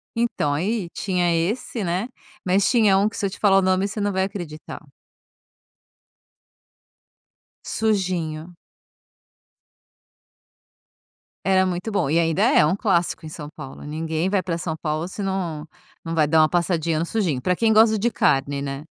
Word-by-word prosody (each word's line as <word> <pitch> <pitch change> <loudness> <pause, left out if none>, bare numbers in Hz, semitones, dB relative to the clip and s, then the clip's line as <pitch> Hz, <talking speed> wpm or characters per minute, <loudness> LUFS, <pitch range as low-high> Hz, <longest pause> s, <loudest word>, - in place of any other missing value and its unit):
Então, 230 -11 0
aí 185 +4 -1
tinha 180 -3 0
esse, 205 +6 -2
né, 185 +6 -2 0.4
mas 190 +2 +3
tinha 215 -6 +4
um 200 +2 +3
que 215 - -6
se - - -2
eu - - 0
te 190 - -10
falar 195 -2 +4
o - - +2
nome 190 +1 +2
você 210 +1 -5
não 205 0 0
vai 190 -1 0
acreditar. 175 -7 -7 2.8
Sujinho. 180 -6 -2 2.9
Era 190 -1 +4
muito 180 +3 -3
bom 200 -9 0
e 160 +3 +3
ainda 165 -2 +1
é - - +5
um 155 - +1
clássico 175 -6 0
em - - -7
São 150 -1 -8
Paulo, 150 -3 -10
ninguém 160 +3 -2
vai 195 -2 +1
pra 170 -1 -2
São 165 -1 -3
Paulo 155 +1 -3
se 200 +2 -6
não 175 -6 -3 0.4
não 165 - -4
vai 155 -2 +3
dar 160 +1 +4
uma 155 - +4
passadinha 170 -2 0
no 165 - 0
Sujinho, 170 - -1
pra 180 +7 +1
quem 225 +3 +2
gosta 220 0 +5
de 235 +4 0
carne, 140 -4 +1
né. 140 0 -5
180 Hz, 160 wpm, -23 LUFS, 160-200 Hz, 2.9 s, é